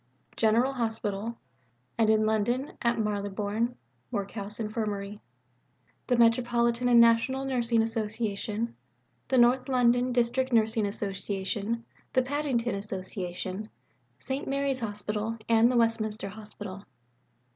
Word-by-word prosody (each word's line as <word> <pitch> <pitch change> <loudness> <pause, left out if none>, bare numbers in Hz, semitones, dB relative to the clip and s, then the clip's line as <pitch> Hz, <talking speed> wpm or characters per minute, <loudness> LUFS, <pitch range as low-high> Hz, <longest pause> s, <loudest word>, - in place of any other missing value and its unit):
General 235 +4 +3
Hospital; 225 -2 -2 0.6
and 225 -2 +3
in 215 0 +4
London, 230 +6 0
at 235 0 +2
Marylebone 210 +2 -1 0.3
Workhouse 205 -1 -5
Infirmary, 210 -2 -3 0.9
the 245 - +2
Metropolitan 235 +1 +3
and 240 -1 +6
National 235 +4 +4
Nursing 235 -3 +2
Association, 220 0 -2 0.5
the 260 - +2
North 250 +2 +4
London 245 0 +3
District 250 +2 +1
Nursing 220 -2 +3
Association, 200 +3 -3 0.3
the 255 - +4
Paddington 260 -3 -1
Association, 190 0 -4 0.5
St. 265 +1 -4
Mary's 275 -1 0
Hospital, 210 0 -3
and 230 +1 +5
the 250 - +2
Westminster 220 -3 0
Hospital. 205 -1 -9
225 Hz, 105 wpm, -28 LUFS, 210-240 Hz, 0.9 s, and